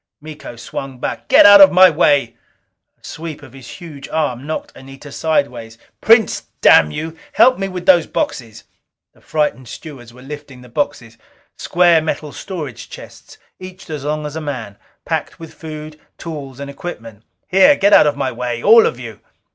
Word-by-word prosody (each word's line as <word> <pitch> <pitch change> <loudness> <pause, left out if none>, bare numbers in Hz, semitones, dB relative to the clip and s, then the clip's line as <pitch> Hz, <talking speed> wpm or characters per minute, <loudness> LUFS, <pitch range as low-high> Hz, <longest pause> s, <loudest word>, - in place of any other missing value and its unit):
Miko 150 -4 -11
swung 130 +3 -8
back. - - -6
"Get - - +6
out 205 0 +9
of 190 -1 +8
my 185 +1 +7
way!" 145 -7 +1 0.6
A - - -43
sweep 160 -2 -8
of 130 -3 -14
his 130 -3 -13
huge 150 -6 -11
arm 140 -4 -3
knocked 155 - -6
Anita 135 +2 -13
sidewise. 125 -8 -2 0.2
"Prince, 225 -1 +3
damn 75 - +5
you, 160 - -6 0.2
help 255 -4 +4
me 195 - -2
with 180 -2 -7
those 175 -4 +4
boxes!" 115 -4 -4 0.5
The - - -26
frightened 150 -5 -2
stewards 130 -7 -11
were 125 +2 -16
lifting 145 -2 -10
the 125 - -15
boxes, 120 -4 -4 0.4
square 175 -2 +2
metal 155 -1 -4
storage 150 - -8
chests - - -13 0.2
each 185 -1 -11
as 150 -3 -6
long 150 +1 -3
as 150 0 -7
a 160 - -5
man, 130 -9 -6 0.3
packed - - -4
with 165 -1 -11
food, 155 -1 -10 0.2
tools, 140 -5 -8
and 140 - -6
equipment. 115 -9 -9 0.3
"Here, 195 +10 +5
get 200 -3 +2
out - - +7
of 145 -1 -1
my 130 - -2
way! 120 -1 -5
All 225 +2 +6
of 120 - -5
you!" 115 -4 -9
150 Hz, 175 wpm, -17 LUFS, 125-165 Hz, 0.6 s, out